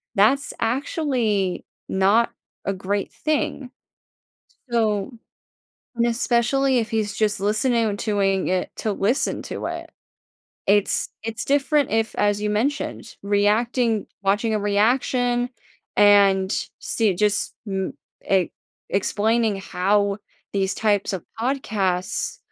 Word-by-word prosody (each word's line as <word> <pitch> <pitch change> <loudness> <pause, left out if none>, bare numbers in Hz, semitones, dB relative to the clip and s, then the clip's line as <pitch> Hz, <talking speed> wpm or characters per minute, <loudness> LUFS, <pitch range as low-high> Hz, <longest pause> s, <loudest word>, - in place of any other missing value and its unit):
that's 270 +8 +3
actually 230 - 0 0.2
not 200 +5 +3 0.3
a 195 - 0
great 195 +1 -2
thing. 285 -4 -1 1.0
So 220 0 +1 0.8
and 235 0 +2
especially 245 +3 +2
if 225 -2 -1
he's 210 -2 -1
just 210 -2 +1
listening 225 +3 +1
doing 200 -3 0
it 185 0 0
to 215 - -1
listen 205 +6 0
to - - -6
it. - - -5 0.8
It's 205 0 +2 0.2
it's 225 0 -4
different 285 +1 +2
if, 225 0 0
as 205 0 +2
you 210 - -1
mentioned, 255 +8 -2
reacting 215 +3 +1 0.2
watching 205 +3 +1
a 210 - 0
reaction 245 +4 +1 0.5
and 200 -1 +5 0.3
see 215 -4 +1
just 210 +2 0
m 190 -1 -2 0.4
e 190 -3 +3 0.4
explaining 215 +2 +1
how 200 +2 +1 0.3
these 195 -1 0
types 205 -2 +1
of 185 -3 -4 0.2
podcasts 210 -7 -1
210 Hz, 110 wpm, -23 LUFS, 200-235 Hz, 1.0 s, and